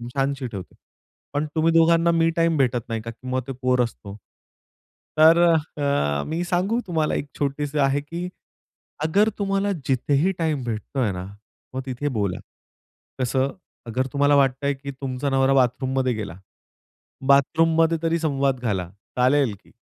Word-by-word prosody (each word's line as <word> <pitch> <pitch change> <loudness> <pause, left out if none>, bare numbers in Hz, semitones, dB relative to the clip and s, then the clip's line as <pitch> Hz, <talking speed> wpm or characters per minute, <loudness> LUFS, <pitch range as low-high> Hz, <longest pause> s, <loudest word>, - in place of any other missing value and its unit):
छानशी 135 -1 -1
ठेवते. 100 -6 -8 0.6
पण 145 +1 0
तुम्ही 160 +1 +3
दोघांना 165 +1 +4
मी 165 0 +3
टाईम 165 -1 +2
भेटत 125 -3 +2
नाही, 115 -1 -2
का 115 +1 -6
की 120 +3 -13
मग 130 0 0
ते - - -4
पोर 125 -1 +2
असतो. 105 -4 -7 1.0
तर 160 +2 +7 0.4
अ, 75 - +1
मी 165 +3 -2
सांगू 185 +6 0
तुम्हाला? 160 -3 0
एक 145 - -3
छोटीशी 145 +1 -2
आहे 140 0 +2
की 170 +5 -5 0.8
अगर 205 +7 +3
तुम्हाला 195 0 0 0.2
जिथेही 140 +6 +2
टाईम 155 -5 -1
भेटतोय 120 0 -2
ना, 90 -1 -5 0.5
मग 130 - -3
तिथे 130 +2 -3
बोला, 100 -3 -1 0.8
कसं? 130 +2 +1 0.4
अगर 130 +3 -1
तुम्हाला 145 0 +4
वाटतंय 140 +1 +2
की 140 +1 -7
तुमचा 135 0 -3
नवरा 135 0 +3
बाथरूममध्ये 130 0 +1
गेला, 105 -5 -5 0.9
बाथरूममध्ये 165 +4 +4
तरी 165 0 +2
संवाद 140 -4 0
घाला, 100 -7 -2 0.3
चालेल 130 -1 +3
की - - -22
140 Hz, 145 wpm, -23 LUFS, 125-160 Hz, 1.0 s, तर